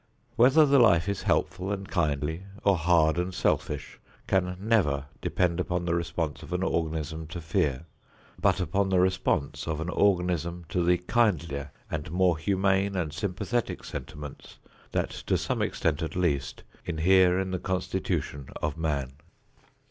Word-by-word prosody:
Whether 130 +6 +6
the 140 -1 +5
life 95 -7 +5
is 100 -1 -1
helpful 95 +2 0
and 100 -1 -4
kindly 80 0 -1 0.2
or 100 -1 +4
hard 85 -1 +3
and 90 +1 -1
selfish - - -1 0.3
can 90 -1 0
never 95 -11 +1 0.2
depend 90 -1 0
upon 90 -1 -1
the 85 - 0
response 85 -2 -2
of 85 - -8
an 90 +1 0
organism 80 -2 -2
to 85 +2 -6
fear, 75 -3 -1 0.6
but - - +3
upon 95 +1 0
the 95 -1 +3
response 90 -6 0
of 80 -1 -2
an 80 +2 -3
organism 90 -3 +1
to 90 - 0
the 90 +1 +4
kindlier 85 - 0 0.2
and 75 -1 -4
more 90 -1 +2
humane 95 +2 +1
and 80 -5 -2
sympathetic 100 +7 -2
sentiments 75 +1 -8 0.3
that - - -1
to - - -1
some - - -2
extent 80 0 0
at 80 - -4
least 70 -7 -1 0.2
inhere 90 +2 +4
in 95 -1 -2
the 90 - -2
constitution 90 -6 -2
of 75 +2 -3
man. 70 -5 -1
90 Hz, 150 wpm, -27 LUFS, 80-95 Hz, 0.6 s, Whether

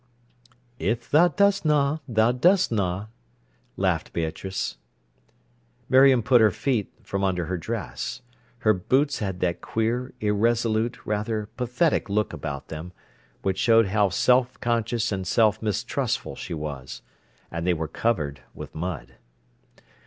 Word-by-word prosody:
"If 120 +5 -2
tha 170 +4 +5
doesna 155 -7 +3
tha 115 0 +3
durs'na," 110 - +2 0.7
laughed - - 0
Beatrice. 80 -4 -3 1.1
Miriam 130 -2 +6
put 125 0 +5
her 110 - +6
feet 115 0 -1
from 100 0 -3
under 90 -3 0
her 95 +3 -2
dress. 90 - -5 0.4
Her 110 - +6
boots 135 +9 +1
had 95 -3 -3
that 85 -1 0
queer, 120 +3 -1
irresolute, 110 +2 +1
rather 105 0 -2
pathetic 125 +2 0
look 105 +1 0
about 70 -3 -6
them, 80 +3 -7 0.5
which 95 -1 -1
showed 115 -3 +4
how 105 0 +3
self 125 +5 +2
conscious 115 -1 0
and 95 -2 -3
self 110 +1 +3
mistrustful 105 -3 -2
she - - -6
was. 75 -4 -6 0.5
And 85 +1 -3
they 90 - +4
were 80 0 -3
covered 75 - -1
with - - -9
mud. 85 -1 -5
110 Hz, 125 wpm, -25 LUFS, 90-120 Hz, 1.1 s, Miriam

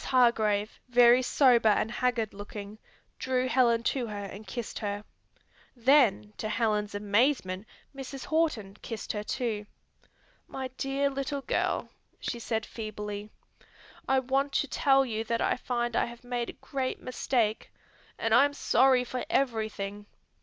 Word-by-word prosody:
Hargrave, 220 -5 +2
very 245 0 +6
sober 245 -3 +4
and 215 +2 +2
haggard 240 -3 0
looking, 205 +1 -8 0.4
drew 255 -1 0
Helen 235 -2 +3
to 245 0 0
her 205 -2 -5
and 200 +2 -9
kissed 235 +3 -5
her. 205 -1 -3 0.7
Then 240 -5 +3
to 215 - -2
Helen's 210 -2 0
amazement 205 -1 +1 0.3
Mrs. 270 0 -7
Horton 245 -12 0
kissed 225 -3 -5
her 210 -1 -3
too. 215 -3 -3 0.8
"My 265 -1 -5
dear 275 +2 -1
little 275 +1 -3
girl," - - 0 0.3
she 235 - -4
said 225 -1 -2
feebly, 210 -2 -6 0.8
"I 265 - +3
want 270 +2 0
to 285 - +1
tell 270 -1 +3
you 225 -3 -2
that 230 0 -1
I - - +2
find 240 -2 -2
I - - +3
have 235 +1 -10
made 245 -1 -3
a - - -7
great 265 -2 -4
mistake, 240 -3 -1 0.5
and 225 -1 0
I 250 +4 +7
am 285 0 -3
sorry 260 -2 +4
for 250 0 -4
everything. 215 -5 -1
235 Hz, 145 wpm, -29 LUFS, 210-260 Hz, 0.8 s, I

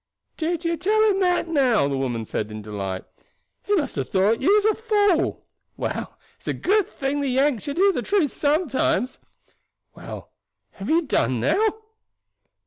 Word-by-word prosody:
"Did 335 +1 -2
you 335 0 0
tell 415 +7 +1
him 390 - 0
that, 360 -2 +2
now?" 260 - +3
the 140 - -1
woman 120 -4 -2
said 105 0 -3
in 105 0 -7
delight; 100 -3 -5 0.6
"he 410 - 0
must 310 -7 -1
have 135 - -2
thought 200 +5 +2
you 305 - +3
was 420 -1 +3
a 435 - +4
fool. 415 -6 +1 0.3
Well, - - -4 0.2
it's - - -22
a - - -1
good 415 0 +1
thing 275 +1 -2
the 280 - -1
Yanks 265 -2 +1
should 285 +1 -4
hear 395 +2 +5
the - - -2
truth 390 -9 +1
sometimes. 285 -4 0 0.7
Well, - - -9 0.4
have 195 - -7
you 330 +2 +3
done 125 - 0
now?" 420 - +2
290 Hz, 170 wpm, -23 LUFS, -, 0.7 s, hear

